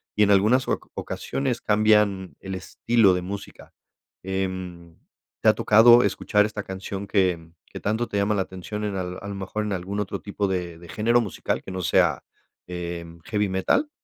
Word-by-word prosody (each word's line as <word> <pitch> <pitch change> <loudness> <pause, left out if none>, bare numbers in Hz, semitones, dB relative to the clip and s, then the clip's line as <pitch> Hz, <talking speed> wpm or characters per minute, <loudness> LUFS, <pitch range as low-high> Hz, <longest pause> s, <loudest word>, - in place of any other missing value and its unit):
y 105 - +4
en 100 - +4
algunas 110 +6 +4
oca - - -2
ocasiones 130 -4 -3
cambian 105 -3 +2
el 95 -1 -6
estilo 100 +2 +2
de 90 - -1
música. 100 +3 -8 0.5
Em, 95 -3 -4 0.4
¿te - - +5
ha - - +6
tocado 120 +3 +6
escuchar 105 -1 +2
esta 105 -1 -4
canción 95 +1 -6
que 90 -5 +1 0.2
que - - -10
tanto 110 +4 -1
te - - -7
llama 100 +1 +1
la 95 - +1
atención 95 +3 -6
en 100 -1 -3
al 90 -1 -4
a 100 - -7
lo 100 - -5
mejor 100 +2 -4
en 105 - -2
algún 95 +2 -4
otro 105 - -3
tipo 100 0 -2
de 90 -3 -3
de 85 - -13
género 115 +3 +2
musical 105 -5 -3
que - - -9
no 95 0 -4
sea, - - +2 0.4
em, 85 -1 -6
heavy 105 -2 0
metal? 95 - +1
100 Hz, 185 wpm, -24 LUFS, 95-105 Hz, 0.5 s, ha